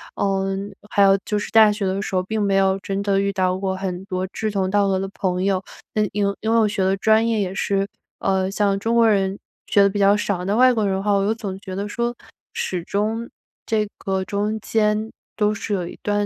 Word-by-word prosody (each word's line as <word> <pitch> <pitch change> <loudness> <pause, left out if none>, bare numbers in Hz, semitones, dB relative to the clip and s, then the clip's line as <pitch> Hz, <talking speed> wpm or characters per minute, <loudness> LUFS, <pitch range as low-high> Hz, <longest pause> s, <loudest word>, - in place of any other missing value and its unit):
嗯， 195 0 -1 0.2
还 200 - +2
有 195 0 +6
就 210 -1 -1
是 - - -5
大 220 -2 +7
学 205 -1 -2
的 190 +1 -1
时 195 - -4
候， 185 - +3
并 220 +2 -2
没 200 -1 +1
有 190 0 +3
真 195 +1 -3
的 200 -1 +1
遇 200 0 +1
到 185 -1 +1
过 190 -1 -2
很 190 -1 -4
多 185 -1 -3
志 215 -1 -2
同 190 -2 0
道 200 0 +2
合 190 -1 +1
的 195 0 -3
朋 180 -1 -1
友， 195 -1 +1 0.3
因 215 - +2
为 210 - -1 0.3
因 220 +1 0
为 - - +4
我 215 - +4
学 200 -2 -1
的 190 +1 +2
专 220 +3 +3
业 220 -2 +1
也 190 -1 -2
是， 195 0 0 0.3
呃， 190 -1 +1
像 200 -1 +1
中 230 +3 0
国 230 -1 +5
人 195 -1 +1 0.3
学 200 - +4
得 200 - +5
比 205 +1 -3
较 200 +1 +5
少， 195 -3 -2
那 200 +2 0
外 255 +1 +6
国 215 -3 0
人 190 -1 +1
的 195 - -3
话， 205 - +1
我 195 0 +2
又 215 - +2
总 195 -4 -5
觉 185 -1 -7
得 200 +2 -3
说， 240 +2 -2 0.4
始 180 -2 -2
终 220 +5 -2 0.4
这 215 -1 +1
个 190 -1 -2
中 205 +3 -1
间 215 0 0 0.2
都 210 -1 +2
是 210 0 -4
有 180 -3 -1
一 - - -10
段 205 0 +1
200 Hz, 260 characters per minute, -22 LUFS, 190-210 Hz, 0.4 s, 大